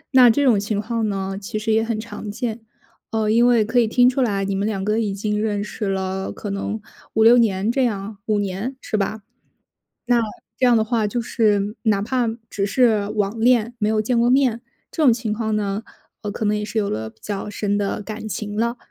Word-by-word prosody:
那 250 -2 +9
这 285 +5 +2
种 235 -7 +4
情 205 0 -2
况 225 0 -1
呢， 195 -1 -3
其 205 +2 -4
实 220 +1 -1
也 225 0 +3
很 225 -1 -2
常 220 -1 -7
见。 230 +1 -4 0.5
呃， 215 -1 0
因 235 +2 +5
为 230 -3 +4
可 245 +2 +2
以 230 - +3
听 245 +2 +4
出 260 +1 +2
来， 200 -5 0
你 200 - -1
们 200 +2 0
两 195 -3 -2
个 215 +2 +1
已 210 -3 0
经 210 +1 -2
认 205 -2 -1
识 210 0 -4
了， 190 0 -2
可 205 - -6
能 205 +2 -3 0.4
5-6 230 +2 +7
年 210 -1 +2
这 265 +1 +1
样， 205 -2 -3
5 210 -1 +2
年， 205 +6 -3
是 - - -4
吧？ 210 +1 -1 0.9
那 240 -1 +4 0.4
这 255 - +2
样 240 -1 +5
的 220 - +3
话 220 -1 0
就 235 +3 -1
是 210 -2 +1
哪 205 -3 +2
怕 245 +2 0 0.2
只 200 -1 -1
是 215 -1 +2
网 210 +1 -1
恋， 240 0 +3
没 210 -2 0
有 215 0 +2
见 235 +2 +1
过 240 +1 +3
面， 255 -4 +3 0.3
这 320 - -1
种 250 -6 +7
情 230 -2 -3
况 220 0 -1
呢， 205 +1 -2 0.4
呃， 205 - -3
可 220 - -4
能 210 0 +2
也 210 - -3
是 220 +1 -2
有 200 - -1
了 110 +1 -3
比 - - -35
较 205 -1 -4
深 205 0 -1
的 205 +1 -2
感 215 +1 -6
情 205 +1 -4
了。 235 +2 0
215 Hz, 235 characters per minute, -22 LUFS, 205-235 Hz, 0.9 s, 那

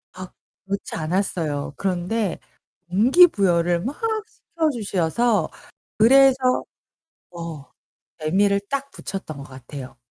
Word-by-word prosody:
막 185 0 -9 0.3
그렇지 200 +1 -4
않았어요. 160 -4 -2
그런데 190 +2 -1 0.5
동기 255 - +6
부여를 175 - +1
막 270 +5 -3 0.3
시켜 335 -6 -2
주셔서 210 - 0 0.5
그래서 260 +2 +5 0.7
어, 165 -5 -8 0.5
재미를 200 +6 +2
딱 280 0 -2
붙였던 190 -6 -6
것 140 - -8
같아요. 130 -1 -10
190 Hz, 220 characters per minute, -23 LUFS, 165-235 Hz, 0.7 s, 동기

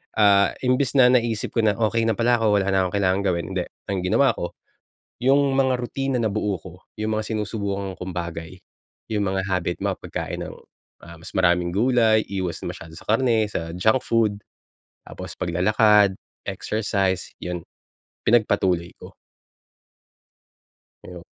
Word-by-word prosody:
Ah, 100 -2 +4
imbes 130 +1 +1
na 125 -2 +7
naisip 115 -3 +1
ko - - -1
na, 110 -2 +3
okey 115 0 +1
na 110 - +1
pala 120 +1 +2
ako, 110 -2 +3
wala 100 -1 +1
na 95 -1 +2
akong 90 - -5
kailangan 95 -1 +2
gawin, 85 -2 0
hindi. 95 -1 -1 0.3
Ang 95 - -1
ginawa 135 +8 +4
ko, 85 - -6 0.6
yung 135 +2 +3
mga 130 -2 +2
rutina 135 +2 -2
nabuo 105 -4 -1
ko, 90 +1 -11 0.3
yung 110 0 -1
mga 110 - -2
sinusubukan 100 -2 -3
kong 90 0 -6
bagay, 85 +1 -6 0.5
yung 105 -2 0
mga 95 0 -2
habit 90 -2 -1
mga - - -1
pagkain - - -5
ng, - - -8 0.5
ah, 85 0 -11
mas 80 - -10
maraming 85 -1 +2
gulay, 110 +1 +3
iwas 95 -3 -3
na - - -4
masyado 80 - -12
sa - - -12
karne, 115 -1 +2
sa 80 -5 -4
junk 110 +7 +3
food, 110 -3 +1 0.6
tapos - - -9
paglalakad, 105 +3 +3 0.3
exercise, 100 -4 -1
'yon 90 -1 -5 0.6
pinagpatuloy 95 -6 +2
ko. - - -12 1.9
Oh. 90 -2 -10
105 Hz, 150 wpm, -23 LUFS, 90-115 Hz, 1.9 s, na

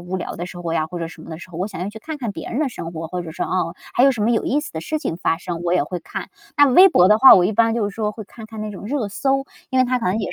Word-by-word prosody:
无 180 +2 -4
聊 185 - -5
的 175 - -5
时 180 -1 -9
候 165 -1 -3
呀 155 -1 0
或 180 - -6
者 165 - -3
什 160 -1 -13
么 - - -11
的 160 - -6
时 180 - -11
候， 170 - -8
我 185 - -1
想 175 - -8
要 190 - -2
去 220 +1 -9
看 310 +4 -6
看 235 -5 -3
别 - - -7
人 240 - -2
的 305 -3 +1
生 170 -8 -7
活， 165 0 -5
或 180 +1 -4
者 165 - -8
说， 160 - -3
哦， 175 -2 -1 0.2
还 245 - +3
有 275 - +7
什 240 -5 -3
么 230 - +2
有 225 - +1
意 285 - +1
思 - - -8
的 160 - -4
事 310 - -3
情 165 - -3
发 165 - 0
生？ 175 -2 -5
我 175 0 0
也 180 -5 +2
会 180 +2 -5
看， - - -7 0.3
那 290 0 +7
微 365 +9 +8
博 180 - +5
的 215 +1 +5
话， 265 - +10
我 180 - +4
一 210 - +1
般 225 +2 +3
就 220 -3 0
是 195 - -10
说 215 -2 -1
会 220 -1 -9
看 220 +2 -12
看 220 -1 -9
那 215 0 -4
种 200 - -9
热 240 -3 -2
搜， 270 +6 0 0.3
因 260 - +1
为 255 - +5
它 250 0 0
可 225 - -2
能 190 +4 +1
也 200 -4 -3
205 Hz, 395 characters per minute, -21 LUFS, 175-245 Hz, 0.3 s, 话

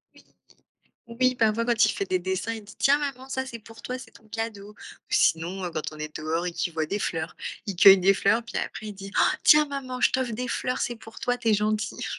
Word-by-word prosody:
Oui, - - -18 0.8
oui, 255 +2 +1
parfois 225 0 +2
quand 230 -2 +3
il 215 - +3
fait 200 - -2
des 185 - +1
dessins 190 +5 -2
il 220 -2 -9
dit: 210 - -14
«Tiens 285 +1 +4
maman, 270 -2 -5
ça, 265 0 -3
c'est 235 -3 -7
pour 225 +1 -15
toi, 255 +1 -4
c'est - - -12
ton 220 - -19
cadeau» 210 -2 -5
ou - - -16 0.4
sinon, 175 +4 +1
heu, 175 - -3
quand 155 -1 -4
on 155 - -11
est 155 0 -6
dehors 160 +3 -2
et 175 - -3
qu'il 175 0 -2
voit 160 -1 -1
des 200 +5 -2
fleurs, 165 -3 -3 0.3
il 195 -3 -4
cueille 195 +1 +9
des 195 +2 +4
fleurs 220 +5 +2
puis 235 - -7
après 215 - -5
il - - -5
dit: 195 0 -9
«Han, - - +4
tiens 300 0 +7
maman 260 -3 -5
je - - +4
t'offre 260 -3 0
des 250 +3 -4
fleurs 250 +1 -2
c'est 240 - -2
pour 225 0 -13
toi, 245 -2 0
tu 225 - -2
es 215 - +5
gentille». 215 +1 -1
215 Hz, 255 wpm, -26 LUFS, 190-245 Hz, 0.8 s, cueille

